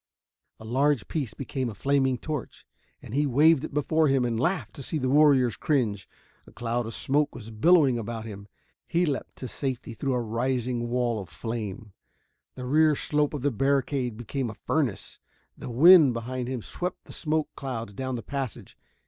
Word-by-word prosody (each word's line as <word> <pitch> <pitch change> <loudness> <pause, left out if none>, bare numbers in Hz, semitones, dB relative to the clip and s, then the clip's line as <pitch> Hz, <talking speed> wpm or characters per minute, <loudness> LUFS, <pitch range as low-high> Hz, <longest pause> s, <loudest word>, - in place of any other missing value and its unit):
A 110 - -11
large 135 +2 +1
piece 135 -10 -3
became 130 -2 -3
a 110 - -8
flaming 135 +2 +1
torch, 150 -2 -6 0.4
and - - -9
he 145 +2 +2
waved 150 +3 +4
it - - -5
before 155 +2 +2
him 135 -2 +2
and 115 -2 -1
laughed 175 +8 -1
to - - -6
see 155 - -2
the 130 -3 0
warriors 140 -5 +5
cringe. 110 -9 -1 0.4
A - - -14
cloud 120 0 -2
of 115 - -6
smoke 145 +2 +1
was 115 -2 -9
billowing 135 +1 +4
about 115 0 -5
him 100 -2 -9 0.4
he 175 +1 +2
leaped 145 -5 -3
to 130 - -6
safety 130 -3 -4
through 135 +3 -2
a - - +1
rising 120 +1 -1
wall 120 -3 0
of 95 - -10
flame. 110 - -5 0.6
The 125 - -6
rear 155 +3 +4
slope 150 +1 0
of 135 - -5
the 145 - +2
barricade 135 -1 0
became 120 +2 -3
a 105 - -8
furnace; 140 -10 -2 0.4
the - - -8
wind 150 +2 +7
behind 125 +2 -4
him 125 -4 -4
swept 180 0 -5
the - - -11
smoke 155 -1 -1
clouds 115 -6 -5
down 130 +4 -3
the 115 - -5
passage. 135 -2 -5
130 Hz, 180 wpm, -27 LUFS, 115-145 Hz, 0.6 s, wind